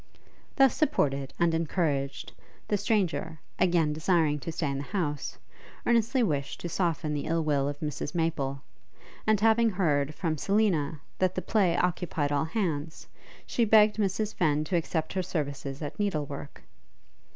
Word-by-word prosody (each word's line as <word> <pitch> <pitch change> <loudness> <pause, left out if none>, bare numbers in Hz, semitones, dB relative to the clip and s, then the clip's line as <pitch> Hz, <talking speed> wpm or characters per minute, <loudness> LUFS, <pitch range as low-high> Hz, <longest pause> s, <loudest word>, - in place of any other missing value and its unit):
Thus 270 -2 +5
supported 140 - +1
and 170 -1 +2
encouraged, 150 -4 -1 0.3
the 210 - +1
stranger, 180 -7 0 0.2
again 170 -4 +3
desiring 160 -2 +2
to 165 - -5
stay 155 -3 -2
in 135 - -3
the - - -4
house, 150 -5 -3 0.5
earnestly 235 +2 +3
wished 145 -9 -1
to 175 - -4
soften 165 -4 -1
the 145 -1 -2
ill 165 0 +1
will 145 -3 +1
of 145 0 -6
Mrs 150 0 -4
Maple; 140 -5 -1 0.6
and 215 -2 +4
having 225 +2 +4
heard, 155 -7 0
from 160 -4 -2
Selina, 180 -8 +1 0.2
that 185 -1 +1
the 185 - -1
play 190 -6 +2
occupied 170 -4 0
all 145 +1 +1
hands, 160 -5 -3 0.4
she 240 - 0
begged 215 -1 +5
Mrs 210 +1 0
Fenn 150 -3 +1
to 165 +4 -2
accept 160 -1 -1
her 190 - 0
services 145 -4 -4
at 145 - -6
needle 190 -8 0
work. 140 0 -9
165 Hz, 155 wpm, -28 LUFS, 145-195 Hz, 0.6 s, Thus